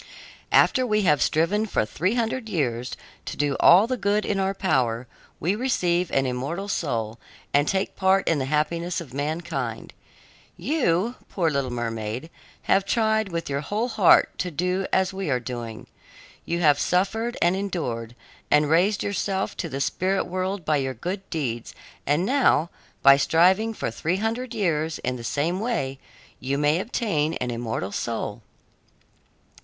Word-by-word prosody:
"After 260 - +4
we 215 -4 +1
have 150 -5 +3
striven 200 +8 +2
for 150 - 0
three 185 - -1
hundred 230 0 -1
years 125 - -2 0.3
to - - -5
do 145 -2 +1
all 185 +5 +7
the 255 +2 -2
good 205 0 +1
in 200 - 0
our 195 0 0
power, 125 -10 0 0.3
we 180 +5 +1
receive 180 -8 0
an 135 - +1
immortal 140 +10 -3
soul 115 - -2 0.3
and 145 +1 +3
take 195 0 -1
part 190 0 +2
in 165 -3 +2
the 130 - -1
happiness 165 +5 -1
of 150 -7 -10
mankind. 145 -5 -3 0.6
You, 235 - 0
poor 170 -4 0
little 140 -3 -1
mermaid, 115 +4 -4 0.3
have 195 - +3
tried 220 0 +1
with 170 -1 -3
your 140 0 -2
whole 215 +10 -2
heart 205 -6 +4
to 180 - -1
do 180 +4 -1
as 190 0 +2
we 190 -4 -3
are 130 -2 +1
doing. 120 -1 -6 0.6
You 170 +1 -1
have 150 -3 +4
suffered 225 +6 0
and 175 +2 +3
endured, 125 - -3 0.3
and 150 0 +3
raised 190 +5 +3
yourself 195 -1 -2
to 170 - -3
the 135 - -4
spirit 190 +7 0
world 185 0 -3
by 155 -1 +2
your 135 -1 -2
good 190 - -5
deeds, 120 -8 -3 0.3
and 150 +6 +2
now, 245 - +3 0.3
by 140 0 +8
striving 185 +9 +3
for 160 - -3
three 165 +10 -1
hundred 230 +4 -2
years 160 -6 0
in 125 0 -3
the 120 - -9
same 160 +9 -1
way, 140 - -2 0.4
you 135 +2 -2
may 150 +3 +2
obtain 165 -8 -1
an 125 -1 -3
immortal 115 -5 -3
soul." 115 0 -3
170 Hz, 160 wpm, -24 LUFS, 135-195 Hz, 0.6 s, by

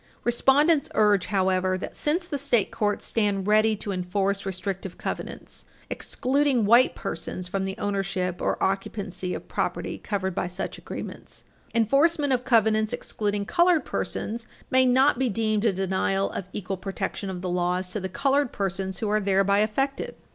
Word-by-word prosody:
Respondents 280 +5 +3
urge, 210 -3 +4
however, 185 -1 +1
that, 185 - -7
since 330 +4 0
the 290 -5 -4
state 245 -7 +1
courts 210 -2 -1
stand 205 -4 0
ready 215 +1 +4
to 205 0 -5
enforce 195 +2 -1
restrictive 190 0 -4
covenants - - -6 0.3
excluding 265 -3 +1
white 235 +5 +5
persons 180 0 -5
from 190 +1 -2
the 190 0 -4
ownership 195 -3 -2
or - - 0
occupancy 190 -1 -2
of - - -8
property - - -2
covered 190 -3 -2
by 175 - -1
such 180 +2 -4
agreements, - - -8 0.3
enforcement 280 +5 +3
of 250 -1 0
covenants 220 -3 +3
excluding 205 -1 -2
colored 345 - +3
persons 230 +2 -3 0.2
may 260 0 +5
not 260 0 +4
be 260 -2 +2
deemed 215 0 0
a 220 - +5
denial 190 +1 0
of 185 - -5
equal 195 -1 -4
protection 195 +1 -4
of 180 -1 -5
the 185 - -2
laws 180 +1 0
to 210 - -2
the 190 -1 -4
colored 275 +4 +1
persons 190 -1 -3
who 220 - 0
are 215 +1 +2
thereby 195 0 +3
affected. 270 +6 -1
205 Hz, 160 wpm, -26 LUFS, 190-240 Hz, 0.3 s, white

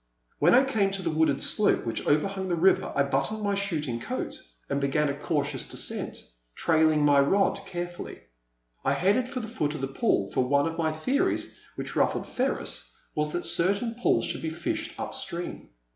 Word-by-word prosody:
When 170 +9 +6
I 260 - +7
came 220 -8 +1
to 195 -1 -3
the 165 - 0
wooded 155 -3 +2
slope 210 - +2
which 115 -1 -3
over 150 +6 +3
hung 195 -1 -4
the 175 - +1
river 185 +3 +3
I 140 - +4
buttoned 215 +10 -1
my 200 -1 +1
shooting 160 -11 -1
coat - - -4 0.3
and 140 0 -1
began 145 +2 +1
a - - 0
cautious 145 -2 -2
descent, - - -2 0.3
trailing 155 -2 +3
my 145 -1 +5
rod 195 +8 +2
care 175 -1 -3
fully. 175 0 -9 0.6
I - - +2
headed 205 +8 +2
for 255 - -3
the 220 - -6
foot 155 -10 -2
of 150 - -5
the 135 - -1
pool, 135 - 0
for - - +2
one 140 +2 +2
of 165 0 -2
my 160 -1 0
theories, 265 - 0 0.2
which - - -5
ruffled - - +1
Ferris, - - -2 0.2
was 150 0 0
that 175 - -2
cer 185 +4 +3
tain 230 +3 -3
pools 245 +1 +2
should - - -3
be 160 - -2
fished 320 - -4
up - - -4
stream. 175 -2 -4
165 Hz, 200 wpm, -27 LUFS, 145-200 Hz, 0.6 s, I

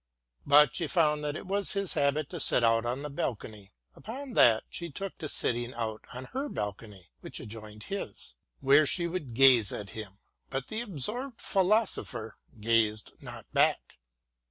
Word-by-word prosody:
But 145 -1 +6
she 165 - -1
found 150 -3 +2
that 150 0 -2
it - - -7
was 200 +1 -1
his 200 -2 -1
habit 140 +1 +1
to 175 - -5
sit 125 - +3
out 115 0 +3
on 130 +4 -2
the 150 - -4
balcony; 105 -6 -5 0.2
upon 260 +4 -8
that 115 - +5
she 170 -1 -5
took 195 +6 -5
to 155 - -5
sitting 120 -1 -1
out 110 -2 -4
on 125 +1 -7
her 275 +3 -2
balcony, 105 - -6
which - - -7
adjoined 105 -1 -9
his, 195 - -6 0.3
where 140 +2 +5
she 170 +5 +1
would 165 -9 -4
gaze 125 -5 +6
at 100 -1 -6
him, 100 -3 -8 0.3
but 135 0 -3
^6 - - -18
WILLIAM 220 - -2
GODWIN - - -2
AND - - -13
the - - -9
absorbed 240 - 0
philosopher 185 - 0 0.2
gazed 110 -1 +1
not - - -9
back. - - +1
135 Hz, 180 wpm, -29 LUFS, 110-180 Hz, 0.3 s, But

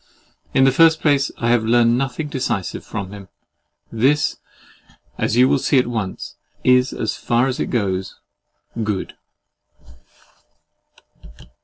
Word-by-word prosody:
In 130 - +5
the 135 - +5
first 160 +3 +4
place, 145 -2 +2
I 120 - -1
have 120 -2 +2
learned 115 +1 +3
nothing 135 +3 -2
decisive 120 -9 -3
from 100 -3 -6
him. 100 -2 -10 0.6
This, 140 +6 +1 0.8
as 115 - 0
you 125 +1 +6
will 140 - +2
at 130 -2 +5
once 110 -6 -5 0.3
see, 125 - +6
is, 125 +1 -1
as 110 - -3
far 120 +1 +1
as 130 -1 -3
it - - -1
goes, 95 -5 -2 0.6
good. 105 -3 -3
120 Hz, 130 wpm, -20 LUFS, 110-135 Hz, 0.8 s, you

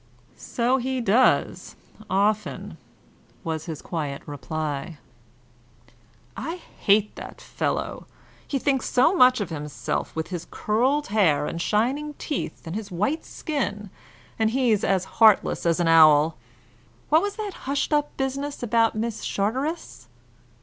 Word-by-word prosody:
"So 245 +2 0
he 260 0 -2
does, 235 +3 +2 0.3
often," 205 +3 -1 0.6
was 160 -1 -3
his 160 -4 -7
quiet 150 -5 -4
reply. 150 +1 -4 1.4
"I 330 - -4 0.2
hate 210 +1 +3
the - - -9
fellow! - - -3 0.4
He 280 - -1
thinks 270 -1 0
so 255 +9 +4
much 255 -5 +6
of 195 -5 -3
himself, 150 -2 -4
with 160 +1 -3
his 175 -2 -5
curled 255 +7 0
hair 185 -9 +3
and 170 - -4
shining 270 +10 0
teeth, 290 - -5
and 165 +2 -5
his 215 -2 -5
white 210 - -1
skin; 210 - -4 0.5
and 220 0 +3
he's 235 -4 +1
as 190 -1 +1 0.2
heartless 215 -5 +5
as 170 +1 +2
an 175 - +1
owl. 155 -1 +6 0.7
What 315 +2 +5
was 405 0 -3
that 420 -3 -5 0.2
hushed 280 +2 0
up 295 0 0
business 275 +1 -3
about 230 -1 +2
Miss 220 0 -3
Charteris?" 215 - -3
215 Hz, 130 wpm, -24 LUFS, 170-265 Hz, 1.4 s, much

